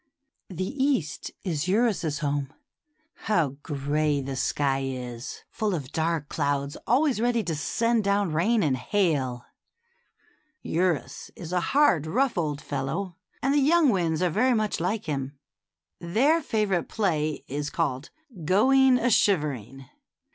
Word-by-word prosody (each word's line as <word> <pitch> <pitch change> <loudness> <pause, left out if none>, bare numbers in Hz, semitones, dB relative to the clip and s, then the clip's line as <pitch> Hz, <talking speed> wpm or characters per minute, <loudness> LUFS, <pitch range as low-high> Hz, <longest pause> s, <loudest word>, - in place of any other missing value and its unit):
The 185 0 -3 0.2
East 230 - -1
is 165 -3 -2
Eurus's 195 -7 +1
home. 140 -1 -1 0.8
How 170 -9 +2
gray 145 0 0
the 135 0 -4
sky 135 +1 0
is, 125 -2 -6
full 210 -3 -1
of 140 -4 -6
dark 160 -2 -1
clouds 145 -2 -1
always 260 -2 +2
ready 235 -1 +1
to 170 - -2
send 230 +9 0
down 200 -4 +1
rain 210 +7 +2
and 140 -4 +2
hail! 130 -4 0 1.2
Eurus 165 -6 -1
is 170 0 -7
a 180 - +3
hard, 195 - +3
rough 265 +11 +1
old 150 -4 -2
fellow, 145 +7 -3 0.3
and 270 +1 +2
the 290 - +4
young 310 +2 +4
winds 170 -5 +1
are 180 - +2
very 250 +8 +2
much 215 -1 -1
like 195 +6 -1
him. 140 -2 -4 0.6
Their 260 - +2
favorite 210 - 0
play 155 -8 -1
is 145 +2 -3
called 145 -4 -2 0.3
Going 260 - +4
a 245 0 +1
Shivering." 135 - +1
170 Hz, 135 wpm, -26 LUFS, 145-215 Hz, 1.2 s, the